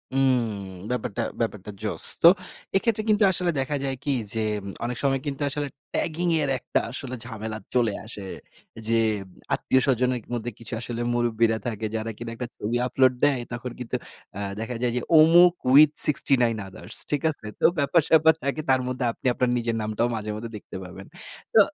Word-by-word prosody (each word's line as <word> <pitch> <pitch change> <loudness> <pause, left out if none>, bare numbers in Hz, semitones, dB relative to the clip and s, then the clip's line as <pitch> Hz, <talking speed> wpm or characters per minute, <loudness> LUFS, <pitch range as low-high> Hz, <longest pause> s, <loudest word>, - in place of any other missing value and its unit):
উম 135 -2 +4 0.5
ব্যাপারটা 115 -5 -2 0.2
ব্যাপারটা 105 -3 -3
জোশ। 110 -1 -2 0.2
তো - - +10 0.5
এক্ষেত্রে 215 +2 +1
কিন্তু 210 0 +4
আসলে 180 -1 +1
দেখা 135 +2 -1
যায় 135 -1 -1
কি, - - -3 0.2
যে 115 - -1 0.4
অনেক 120 0 -3
সময় 135 -1 +2
কিন্তু 140 0 -4
আসলে 145 +1 -2 0.3
ট্যাগিংয়ের 165 -3 +1
একটা - - -1
আসলে 130 0 -4
ঝামেলা 110 -2 -5 0.2
চলে 115 -4 +2
আসে। 110 -2 -3 0.7
যে 115 - +1 0.6
আত্মীয়স্বজনের 125 -1 +1
মধ্যে 120 0 -3
কিছু 115 - -8
আসলে 120 -1 -4
মুরুব্বিরা 115 -2 +1
থাকে, 110 -2 -3
যারা 110 0 -2
কিনা 115 0 -6
একটা 125 +1 -5
ছবি 115 +3 -1
আপলোড 130 0 +3
দেয়। 145 -3 +4
তখন 120 +1 -5
কিন্তু 125 -2 -4 0.4
অ্যা 100 - -4 0.2
দেখা 115 +3 -4
যায় 125 -1 +1
যে - - 0 0.2
অমুক 170 +3 +7 0.2
with 150 +2 +8
69 125 -5 +2
others, 95 - -11 0.2
ঠিক 145 - 0
আছে? 150 -8 -6
তো - - +2
ব্যাপার 145 +4 +3
স্যাপার 160 0 +6
থাকে, 140 +3 -1
তার 130 -1 +4
মধ্যে 125 0 -2
আপনি 115 - -19
আপনার 125 0 0
নিজের 115 -1 -1
নামটাও 110 +2 0
মাঝেমধ্যে 110 +1 -5
দেখতে - - -12
পাবেন। 95 +2 -10 0.5
তো - - +7
125 Hz, 170 wpm, -25 LUFS, 115-140 Hz, 0.7 s, তো